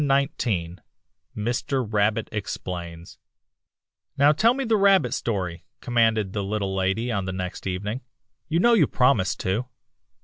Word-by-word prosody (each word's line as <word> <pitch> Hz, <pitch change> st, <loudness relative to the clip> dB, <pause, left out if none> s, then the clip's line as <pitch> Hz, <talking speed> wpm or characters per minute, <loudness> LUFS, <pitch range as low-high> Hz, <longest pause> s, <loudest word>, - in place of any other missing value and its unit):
RABBIT 140 Hz, +1 st, +2 dB, 0.4 s
EXPLAINS 90 Hz, -, -14 dB, 0.6 s
AN 105 Hz, +1 st, -3 dB
EASTER 125 Hz, +1 st, -1 dB, 0.6 s
STORY 85 Hz, -3 st, -6 dB, 1.1 s
"Now 145 Hz, +2 st, +6 dB
tell 225 Hz, +10 st, +3 dB
me 275 Hz, -, -2 dB
the 225 Hz, -1 st, +2 dB
rabbit 195 Hz, -, +4 dB
story," 95 Hz, -6 st, -3 dB, 0.2 s
commanded 110 Hz, -5 st, +1 dB
the 100 Hz, -, -2 dB
Little 100 Hz, -1 st, -2 dB
Lady 95 Hz, +6 st, 0 dB
on 100 Hz, -4 st, -1 dB
the 95 Hz, -, -3 dB
next 90 Hz, 0 st, -5 dB
evening. 105 Hz, +7 st, -3 dB, 0.5 s
"You 165 Hz, +1 st, +1 dB
know 240 Hz, +3 st, +5 dB
you 225 Hz, -, +5 dB
promised 110 Hz, -8 st, +2 dB
to." 105 Hz, +7 st, -1 dB
110 Hz, 140 wpm, -24 LUFS, 95-140 Hz, 1.1 s, Now